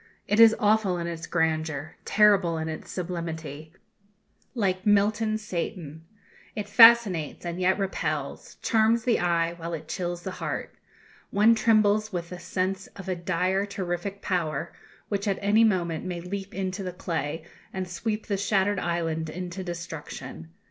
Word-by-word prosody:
It 210 Hz, -, +1 dB
is 225 Hz, -1 st, +8 dB
awful 210 Hz, -3 st, +2 dB
in 170 Hz, -, -3 dB
its 165 Hz, -1 st, -5 dB
grandeur, 160 Hz, -3 st, -1 dB
terrible 200 Hz, -5 st, +4 dB
in 160 Hz, 0 st, -3 dB
its 155 Hz, -, -7 dB
sublimity, 160 Hz, -4 st, -5 dB, 0.8 s
like 190 Hz, -5 st, 0 dB
Milton's 215 Hz, +1 st, +2 dB
Satan. 165 Hz, -5 st, -5 dB, 0.5 s
It 210 Hz, -1 st, -4 dB
fascinates, 210 Hz, -, +6 dB
and 175 Hz, +1 st, -4 dB
yet 185 Hz, +1 st, +3 dB
repels; 155 Hz, -7 st, -3 dB
charms 225 Hz, +1 st, +3 dB
the 240 Hz, -1 st, +2 dB
eye, 170 Hz, -1 st, +1 dB
while 170 Hz, 0 st, -6 dB
it 155 Hz, -1 st, -9 dB
chills 175 Hz, 0 st, -4 dB
the 190 Hz, -, -4 dB
heart. -, -, -4 dB, 0.6 s
One 210 Hz, +3 st, +5 dB
trembles 215 Hz, -1 st, +3 dB
with 175 Hz, -2 st, -4 dB
the 180 Hz, -, -6 dB
sense 185 Hz, +2 st, -2 dB
of 195 Hz, -2 st, -9 dB
a 185 Hz, -, 0 dB
dire 185 Hz, +3 st, 0 dB
terrific 195 Hz, 0 st, -4 dB
power, 165 Hz, -3 st, -2 dB, 0.4 s
which 200 Hz, 0 st, -2 dB
at 195 Hz, -, +1 dB
any 210 Hz, +3 st, +4 dB
moment 175 Hz, -7 st, +1 dB
may 180 Hz, -2 st, -4 dB
leap 195 Hz, +3 st, -6 dB
into 190 Hz, +1 st, -3 dB
the 180 Hz, -2 st, -4 dB
clay, 160 Hz, -3 st, -3 dB, 0.3 s
and 190 Hz, -1 st, -4 dB
sweep 215 Hz, +5 st, -3 dB
the 200 Hz, -, -1 dB
shattered 200 Hz, 0 st, +1 dB
island 165 Hz, -2 st, -2 dB
into 180 Hz, +3 st, -5 dB
destruction. 170 Hz, -, -7 dB
185 Hz, 150 wpm, -26 LUFS, 170-205 Hz, 0.8 s, is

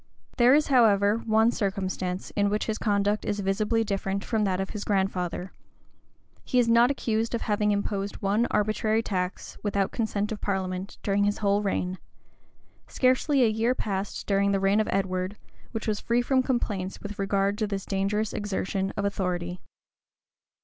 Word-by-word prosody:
There 250 Hz, +2 st, +6 dB
is, 300 Hz, 0 st, +2 dB
however, 210 Hz, -5 st, +4 dB
one 220 Hz, +1 st, +4 dB
circumstance 190 Hz, -3 st, -3 dB
in 205 Hz, -1 st, +1 dB
which 210 Hz, +1 st, -1 dB
his 220 Hz, -1 st, -2 dB
conduct 205 Hz, 0 st, +1 dB
is 205 Hz, -, -2 dB
visibly 210 Hz, +4 st, +1 dB
different 195 Hz, -1 st, -2 dB
from 220 Hz, -3 st, 0 dB
that 185 Hz, -1 st, 0 dB
of 195 Hz, -, -3 dB
his 210 Hz, -2 st, -5 dB
grandfather: 190 Hz, -2 st, -1 dB, 0.9 s
he 250 Hz, -, -1 dB
is 245 Hz, -2 st, +4 dB
not 235 Hz, +1 st, +5 dB
accused 230 Hz, -4 st, -1 dB
of 235 Hz, -, -3 dB
having 210 Hz, 0 st, +1 dB
imposed 200 Hz, 0 st, -2 dB
one 205 Hz, +4 st, +1 dB
arbitrary 215 Hz, +1 st, +1 dB
tax, 180 Hz, -3 st, -3 dB
without 200 Hz, -2 st, 0 dB
consent 210 Hz, -2 st, -1 dB
of 215 Hz, -, -5 dB
parliament, 190 Hz, -1 st, -3 dB
during 200 Hz, 0 st, +2 dB
his 205 Hz, 0 st, +1 dB
whole 200 Hz, 0 st, +2 dB
reign;[] 185 Hz, -2 st, -2 dB, 0.9 s
scarcely 260 Hz, +2 st, +2 dB
a -, -, +5 dB
year 225 Hz, +3 st, +1 dB
passed 195 Hz, -3 st, -3 dB
during 200 Hz, 0 st, +2 dB
the 195 Hz, -, +2 dB
reign 195 Hz, +2 st, +3 dB
of 215 Hz, -, 0 dB
Edward, 185 Hz, +1 st, -1 dB, 0.3 s
which 225 Hz, -1 st, -4 dB
was 210 Hz, -1 st, 0 dB
free 240 Hz, +1 st, +1 dB
from 260 Hz, +1 st, +3 dB
complaints 205 Hz, -7 st, -2 dB
with 205 Hz, 0 st, -7 dB
regard 195 Hz, 0 st, +1 dB
to 215 Hz, -, 0 dB
this 200 Hz, -2 st, -4 dB
dangerous 200 Hz, +2 st, -1 dB
exertion 195 Hz, -1 st, -2 dB
of 200 Hz, -, 0 dB
authority. 180 Hz, -2 st, -2 dB
205 Hz, 165 wpm, -27 LUFS, 195-220 Hz, 0.9 s, There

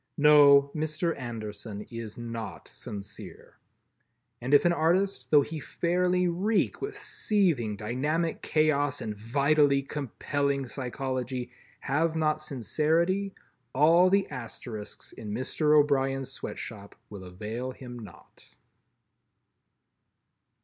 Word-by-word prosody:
No, 145 Hz, -1 st, +7 dB
Mr. 155 Hz, +2 st, -1 dB
Anderson 110 Hz, -4 st, -6 dB
is 115 Hz, -2 st, -7 dB
not 115 Hz, -6 st, -6 dB
sincere. 100 Hz, -1 st, -9 dB, 0.8 s
And 125 Hz, +3 st, -3 dB
if 145 Hz, +4 st, +6 dB
an 175 Hz, -, +4 dB
artist, 180 Hz, +5 st, +1 dB
though 145 Hz, -2 st, +6 dB
he 160 Hz, +2 st, -6 dB
fairly 180 Hz, +4 st, +1 dB
reek 190 Hz, +4 st, 0 dB
with 415 Hz, +1 st, -4 dB
seething 170 Hz, -, +1 dB
dynamic 145 Hz, +10 st, -1 dB
chaos 145 Hz, -2 st, +1 dB
and 105 Hz, -1 st, -4 dB
vitally 140 Hz, +5 st, +2 dB
compelling 140 Hz, 0 st, -2 dB
psychology, 130 Hz, -1 st, -4 dB, 0.3 s
have 160 Hz, +4 st, 0 dB
not 155 Hz, -1 st, +1 dB
sincerity, 160 Hz, -, 0 dB, 0.4 s
all 165 Hz, +6 st, +6 dB
the 195 Hz, +1 st, +2 dB
Asterisks 115 Hz, -4 st, -7 dB
in 105 Hz, -2 st, -8 dB
Mr. 150 Hz, +6 st, +2 dB
O'Brien's 135 Hz, -2 st, +1 dB
sweatshop 105 Hz, -6 st, -8 dB, 0.2 s
will 100 Hz, -2 st, -8 dB
avail 110 Hz, +7 st, -5 dB
him 125 Hz, -2 st, -9 dB
naught. 105 Hz, -3 st, -15 dB
140 Hz, 105 wpm, -28 LUFS, 120-160 Hz, 0.8 s, No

